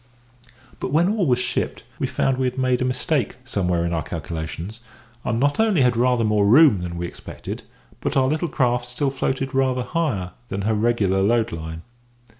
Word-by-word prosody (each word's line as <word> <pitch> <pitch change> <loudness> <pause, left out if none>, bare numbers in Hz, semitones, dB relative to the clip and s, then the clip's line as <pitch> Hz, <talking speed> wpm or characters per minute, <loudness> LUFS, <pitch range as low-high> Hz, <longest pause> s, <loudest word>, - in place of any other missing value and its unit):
But - - -3
when 165 +5 +3
all 205 -5 +1
was 125 -2 +3
shipped, 125 - -2 0.2
we - - 0
found 135 -1 0
we 130 - +2
had 125 +1 -4
made 130 -1 +1
a - - +2
mistake 130 +2 0
somewhere 90 -7 0
in 85 - -1
our 80 - 0
calculations, 80 +6 -5 0.4
and 115 - -1
not 145 - +1
only 215 -8 +3
had 125 -2 +3
rather 125 0 +2
more 105 -2 +3
room 130 - +7
than 85 -1 -5
we 85 - -2
expected, - - -7 0.4
but - - -1
our 130 -1 +4
little 155 +4 0
craft 125 -2 +1
still 135 +3 -1
floated 135 0 -2
rather 130 -1 +1
higher 125 - -1 0.2
than 100 +1 -3
her 110 +2 +1
regular 105 -3 +2
load 115 +3 +2
line. 80 0 -6
120 Hz, 190 wpm, -23 LUFS, 95-135 Hz, 0.4 s, room